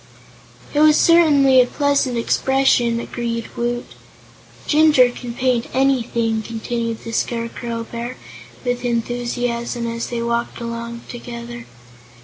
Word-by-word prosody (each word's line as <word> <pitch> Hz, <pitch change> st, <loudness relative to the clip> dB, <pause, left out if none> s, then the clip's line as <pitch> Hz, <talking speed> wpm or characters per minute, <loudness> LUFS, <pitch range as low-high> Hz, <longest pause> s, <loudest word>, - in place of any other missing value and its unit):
"It 295 Hz, -, +1 dB
was 305 Hz, 0 st, +6 dB
certainly 285 Hz, -6 st, +6 dB
a 250 Hz, -, +2 dB
pleasant 280 Hz, -3 st, +1 dB
expression," 240 Hz, -1 st, +2 dB
agreed 235 Hz, -1 st, -4 dB
Woot. 240 Hz, 0 st, -2 dB, 0.8 s
"Jinjur 295 Hz, -5 st, +5 dB
can 245 Hz, -1 st, -7 dB
paint 250 Hz, -2 st, +1 dB
anything," 235 Hz, -4 st, +1 dB
continued 230 Hz, +1 st, -4 dB
the 230 Hz, -, -6 dB
Scarecrow 230 Hz, 0 st, -3 dB
Bear, 235 Hz, +2 st, -6 dB, 0.5 s
with 245 Hz, 0 st, -1 dB
enthusiasm, 240 Hz, 0 st, -2 dB
as 230 Hz, 0 st, -3 dB
they 235 Hz, -1 st, -3 dB
walked 235 Hz, 0 st, -2 dB
along 235 Hz, 0 st, -5 dB
together. 240 Hz, -1 st, -8 dB
240 Hz, 115 wpm, -20 LUFS, 235-255 Hz, 0.8 s, was